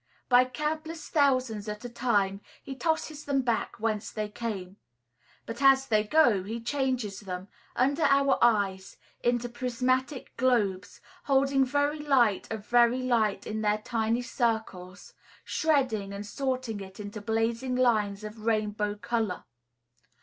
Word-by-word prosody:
By 250 0 +6
countless 310 +4 -4
thousands 255 -8 +1
at 210 +3 -6
a - - -2
time 205 -5 0 0.2
he 275 - -6
tosses 315 0 -2
them 275 -2 0
back 235 -1 -1
whence 215 -1 -1
they 215 -1 -3
came; 200 -4 -5 0.7
but 230 - -7
as 270 -1 +6
they 215 -4 +2
go, 235 -4 +4
he 220 +5 -5
changes 245 -5 -2
them, 185 -1 -7 0.3
under 280 +5 +2
our 275 -1 +3
eyes, 200 -5 +1 0.3
into 240 0 +1
prismatic 255 +3 -2
globes, 210 -7 0 0.2
holding 270 0 +3
very 285 +3 0
light 250 -11 +2
of 215 -2 -5
very 240 +1 +3
light 225 -5 +1
in 215 0 -3
their 210 0 +2
tiny 225 +2 -1
circles, 220 -7 -3 0.3
shredding 255 -11 0
and 200 +1 -6
sorting 255 -1 -3
it 190 0 -10
into 205 0 -7
blazing 230 +4 -1
lines 215 -5 +1
of 215 +1 -8
rainbow 210 -2 0
color. 220 -3 -2
235 Hz, 135 wpm, -28 LUFS, 210-260 Hz, 0.7 s, By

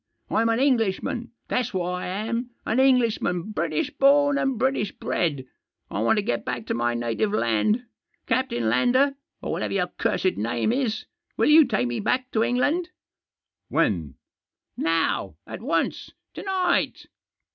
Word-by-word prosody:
Fm 230 +1 +2
an 225 - +1
Englishman, 240 -2 0 0.2
that's 250 -4 -1
what 180 -1 -1
I 180 0 -3
am 225 +6 -3
— - - -44
an 235 - +1
Englishman, 230 -8 +2
British 295 +7 -1
born 285 0 +4
and 270 -2 0
British 255 -4 0
bred. 145 -7 -2 0.5
I 100 - -2
want 115 - +3
to 210 - +1
get 120 -10 -1
back 120 -2 -4
to - - -2
my 120 0 0
native 120 - -1
land. 210 - +1 0.4
Captain 230 - 0
Lander, 250 - +3 0.3
or - - -3
whatever - - -2
your 180 -2 0
cursed 185 - +1
name 115 - 0
is, 245 -3 -1 0.3
will - - +3
you 310 0 +8
take 215 - 0
me 120 0 -2
back 255 +4 -1
to 220 - +1
England? 290 +9 +1 0.4
" - - -63
"When?" 80 -9 +1 0.3
" - - -67 0.2
Now 165 0 0
— - - -56
at - - -6
once - - -1
— - - -59
to - - -7
night 370 -2 0
225 Hz, 170 wpm, -25 LUFS, 165-260 Hz, 0.5 s, you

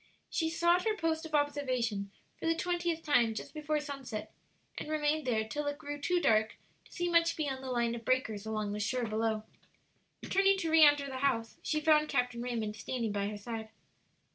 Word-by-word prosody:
She 325 -1 0
sought 345 +2 +3
her 435 -1 +1
post 320 -2 -1
of 310 - -2
observation 255 -8 0 0.3
for - - -3
the 330 - +3
twentieth 345 -1 -1
time 235 -7 +3
just - - -6
before 305 0 -1
sunset, 275 -7 -6 0.5
and - - -6
remained 305 -1 0
there 220 -3 +1
till 295 +5 -3
it 290 0 -2
grew 290 -1 -6
too 355 +4 +2
dark 220 -8 +2 0.3
to - - -21
see 350 -1 -2
much 335 -1 +3
beyond 270 -4 -2
the 260 - -5
line 235 -2 +1
of 235 -1 -6
breakers 220 -4 0
along 215 -2 -2
the 210 - -3
shore 245 +3 0
below. 220 0 -1 0.8
Turning 390 0 +4
to 330 -4 -2
re 320 0 +6
enter 290 -1 +6
the 265 -1 -5
house, 230 -5 0
she 305 - 0
found 305 0 +4
Captain 245 -1 0
Raymond 230 -4 -2
standing 230 0 -2
by 200 0 -1
her 210 0 -4
side. 220 +1 -6
275 Hz, 195 wpm, -32 LUFS, 225-315 Hz, 0.8 s, re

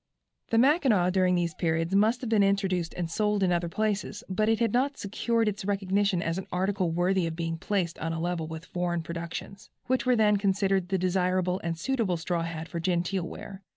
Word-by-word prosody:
The 225 - +2
Mackinaw 250 - +4
during 185 -1 +3
these 170 -2 0
periods 165 +2 -1
must 215 +5 +3
have 245 - -4
been 215 -2 +4
introduced 195 -4 +1
and 175 -2 -2
sold 210 +3 0
in 180 - +2
other 170 -1 0
places, 210 +1 -2
but 215 +3 0
it 225 - +3
had 230 -3 +1
not 275 +3 +1
secured 225 +3 0
its 210 -1 -2
recognition 195 -1 +1
as 165 +2 -1
an 190 - -8
article 190 0 0
worthy 175 +1 +1
of 165 - -4
being 165 -1 -3
placed 180 -4 -1
on 165 +1 -2
a 165 - -3
level 170 -1 -2
with 160 +1 -7
foreign 175 -2 -2
productions, 170 +4 -7 0.2
which 255 0 0
were 250 - +5
then 210 -2 +4
considered 195 -2 +1
the 190 - +1
desirable 185 0 0
and 165 -1 -2
suitable 225 -4 0
straw 170 +1 -2
hat 165 -1 -4
for 170 - -5
genteel 175 +1 0
wear. 195 +3 -9
185 Hz, 205 wpm, -28 LUFS, 170-205 Hz, 0.2 s, were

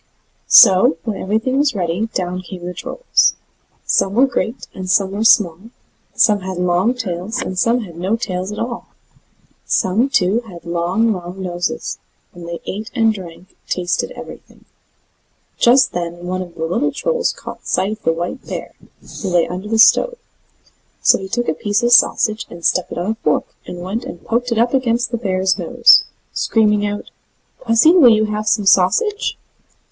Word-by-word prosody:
So, 190 -6 +6
when 215 -3 -4
everything 225 +7 -1
was 290 -4 +1
ready, 180 +3 -1
down 185 -3 -4
came 180 -1 -9
the 180 - -5
Trolls. - - 0 0.5
Some 195 +1 +1
were 255 +3 +5
great, 250 -2 -3
and 185 -1 -7
some 195 0 +2
were 205 +2 -2
small; 185 -7 +4 0.6
some 210 -2 +3
had 190 -1 -6
long 180 +7 +1
tails, 205 0 -4
and 225 -8 -4
some 235 +6 +1
had 175 -7 -10
no 185 +6 -1
tails 185 -4 -4
at 210 - -7
all; 235 0 -5 0.8
some, 220 +9 +1
too, 205 -4 +2
had 175 -4 -12
long, 175 +7 0
long 180 0 -8
noses; 175 -1 -4 0.3
and 175 -1 -10
they 170 - -6
ate 215 +4 -5
and 225 -2 +3
drank, 185 -1 -11
and - - -35
tasted 180 -1 -1
everything. - - -12 0.9
Just 255 +2 +4
then 175 0 -5
one 185 +1 -3
of 175 -2 -9
the 160 - -3
little 235 - -1
Trolls 485 - -1
caught - - -11
sight 195 - 0
of 215 0 -7
the 165 - +1
white 175 +10 -5
bear, - - -6 0.5
who 195 - -3
lay 175 -2 +2
under 185 +3 -6
the 225 +1 0
stove; 485 - +4 0.9
so - - +5
he 190 - -7
took 240 +4 -2
a - - +1
piece 205 +7 -1
of 240 - +2
sausage 220 -2 +3
and 170 -1 -10
stuck 180 - +1
it - - -6
on 180 +5 -1
a - - -3
fork, 150 - 0
and 175 - -7
went 210 +6 -4
and 265 - -10
poked 245 +2 -1
it 230 - 0
up 235 +2 +1
against 245 -2 0
the 235 - -1
bear's 190 -4 0
nose, - - +5 0.3
screaming 210 -2 +1
out: 205 0 -6 0.5
"Pussy, 230 +6 +5
will 335 -9 +7
you 215 -1 +3
have 215 0 -4
some 215 -1 +1
sausage?" 405 - +2
205 Hz, 180 wpm, -18 LUFS, 180-230 Hz, 0.9 s, will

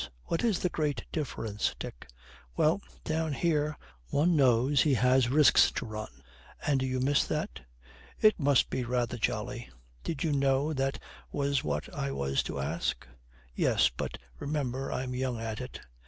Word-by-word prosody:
'What 165 - -2
is 225 -6 +3
the 180 - 0
great 145 -8 -1
difference, 115 -8 -2
Dick?' - - -8 0.5
'Well, 160 +6 +3 0.2
down 160 -1 -1
here 150 -1 0 0.3
one 165 - +2
knows 130 0 +4
he 145 -4 +3
has 125 +1 +4
risks 145 0 +6
to - - -3
run.' 105 - -7 0.4
'And 140 -3 +2
you 130 -1 -1
miss 140 +3 +3
that?' - - -3 0.6
'It 215 -2 +5
must 140 -3 +3
be 130 - -1
rather 120 0 -1
jolly.' 120 +3 -2 0.3
'Did 160 - -3
you 160 - +1
know 140 +2 +2
that 135 -1 0 0.3
was 140 -1 0
what 75 - -2
I 70 - -2
was 70 0 0
to - - -4
ask?' - - -2 0.5
'Yes. - - +3
But, - - -4 0.2
remember, 135 -3 -2
I'm 130 0 -3
young 125 -2 -2
at 110 -1 -4
it.' - - -7
135 Hz, 155 wpm, -30 LUFS, 120-150 Hz, 0.6 s, risks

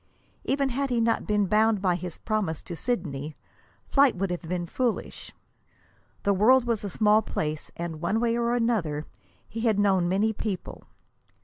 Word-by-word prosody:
Even 275 0 0
had 275 +2 -1
he 245 -2 +1
not 230 0 +1
been 210 -1 +2
bound 215 +2 +3
by 185 -2 +2
his 175 -1 -5
promise 210 -8 -2
to 175 - -6
Sidney, 155 - -3 0.5
flight 275 -2 +4
would 190 0 -2
have 175 - -3
been 175 +1 -3
foolish. 240 +6 -3 0.9
The 200 - +3
world 240 +6 +5
was 230 -3 -1
a 200 - -3
small 210 +3 +4
place, 155 -7 -3
and, 165 -2 -5
one 200 +6 +1
way 230 0 +1
and 235 0 0
another, 225 -11 0 0.4
he 225 - -7
had 220 -3 +2
known 190 -4 +3
many 210 +4 +2
people. 205 -3 -5
210 Hz, 170 wpm, -26 LUFS, 175-230 Hz, 0.9 s, world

